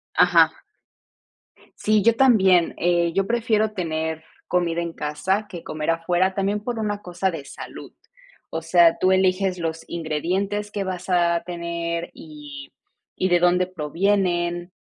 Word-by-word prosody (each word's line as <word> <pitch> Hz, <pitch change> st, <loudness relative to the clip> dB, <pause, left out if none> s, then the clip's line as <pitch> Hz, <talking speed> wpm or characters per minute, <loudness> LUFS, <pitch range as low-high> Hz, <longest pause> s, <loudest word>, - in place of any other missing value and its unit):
Ajá. -, -, +4 dB, 1.2 s
Sí, 215 Hz, -1 st, +2 dB
yo 230 Hz, +1 st, +4 dB
también. 190 Hz, -10 st, +4 dB
Eh, 170 Hz, -1 st, +1 dB
yo 195 Hz, +1 st, 0 dB
prefiero 220 Hz, -2 st, +1 dB
tener 160 Hz, -3 st, -3 dB, 0.2 s
comida 170 Hz, -1 st, 0 dB
en 170 Hz, -1 st, -4 dB
casa 190 Hz, +9 st, -2 dB
que 175 Hz, -3 st, -9 dB
comer 155 Hz, +1 st, -2 dB
afuera, 175 Hz, +3 st, +1 dB
también 200 Hz, +1 st, -1 dB
por 240 Hz, 0 st, -4 dB
una 210 Hz, -1 st, -2 dB
cosa 180 Hz, +2 st, -2 dB
de 155 Hz, -5 st, -7 dB
salud. -, -, -10 dB, 0.6 s
O 160 Hz, -, -3 dB
sea, 165 Hz, 0 st, +4 dB
tú 185 Hz, 0 st, +3 dB
eliges 185 Hz, 0 st, +2 dB
los 165 Hz, -1 st, -4 dB
ingredientes 185 Hz, +6 st, -2 dB
que 200 Hz, -2 st, -3 dB
vas 185 Hz, 0 st, -5 dB
a 170 Hz, -1 st, +2 dB
tener, 170 Hz, -1 st, -4 dB
y 145 Hz, -3 st, -11 dB, 0.4 s
y 185 Hz, -, 0 dB
de 175 Hz, -1 st, +4 dB
dónde 180 Hz, +1 st, +3 dB
provienen, 175 Hz, +1 st, -1 dB
175 Hz, 140 wpm, -23 LUFS, 165-195 Hz, 1.2 s, Ajá